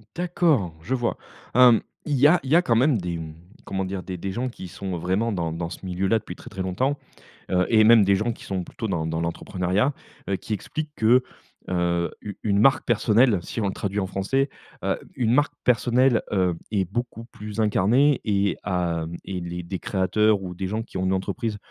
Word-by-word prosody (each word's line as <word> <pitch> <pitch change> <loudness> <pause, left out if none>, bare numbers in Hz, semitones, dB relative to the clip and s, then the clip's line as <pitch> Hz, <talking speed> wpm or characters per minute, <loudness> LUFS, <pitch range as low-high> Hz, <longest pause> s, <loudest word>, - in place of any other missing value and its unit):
D'accord, 165 - +1
je 130 +10 -1
vois. 120 -2 -1 0.4
Hem, 125 -3 +7 0.2
il 150 - 0
y 140 +3 +6
a 175 +3 +5
il 130 - -6
y - - +6
a 175 - +7
quand 115 - +2
même 130 +2 +4
des 85 -1 -3 0.5
comment 95 0 -2
dire 95 0 -4
des 90 0 -6
des 95 +3 -4
gens 125 +5 -2
qui 95 -6 -9
sont 95 0 -5
vraiment 95 +7 0
dans 85 -4 -2
dans 85 0 -4
ce 95 - -9
milieu 90 +1 -1
là 110 +3 +3
depuis 90 -4 -8
très, - - -12
très 95 -1 -4
longtemps, 130 +10 0 0.5
heu, 90 0 +3
et 110 -1 +6
même 115 -2 +7
des 100 0 +4
gens 110 +5 0
qui - - -12
sont 95 -2 -3
plutôt 110 - -6
dans 85 -6 -1
dans 80 0 -2
l'entrepreneuriat, 90 - -1 0.3
heu, 100 - +1
qui 110 - -8
expliquent 150 +9 -4
que, 120 +2 +4 0.5
heu, 85 -1 0
u 100 -2 -7
une 100 -2 +1
marque 135 +6 +4
personnelle 115 -1 +3
si 115 - -4
on 100 - +1
le - - -2
traduit 100 +1 -3
en 95 - 0
français, 135 +9 0 0.3
heu, - - 0 0.2
une 115 -2 +1
marque 145 +3 +2
personnelle, 125 0 +3
heu, 90 -3 +2 0.2
est 100 -3 +1
beaucoup 115 +4 -4
plus 105 -2 -9
incarnée 115 +7 +3
et 100 -3 +1
a 85 -3 -1 0.2
et 95 -2 -4
les 85 0 -5
des 90 +2 -5
créateurs 100 +3 +1
ou 90 -1 -6
des 95 +1 -4
gens 110 +4 -2
qui 115 - -7
ont 95 - -1
une 95 - +2
entreprise 100 +3 -2
100 Hz, 215 wpm, -24 LUFS, 90-120 Hz, 0.5 s, Hem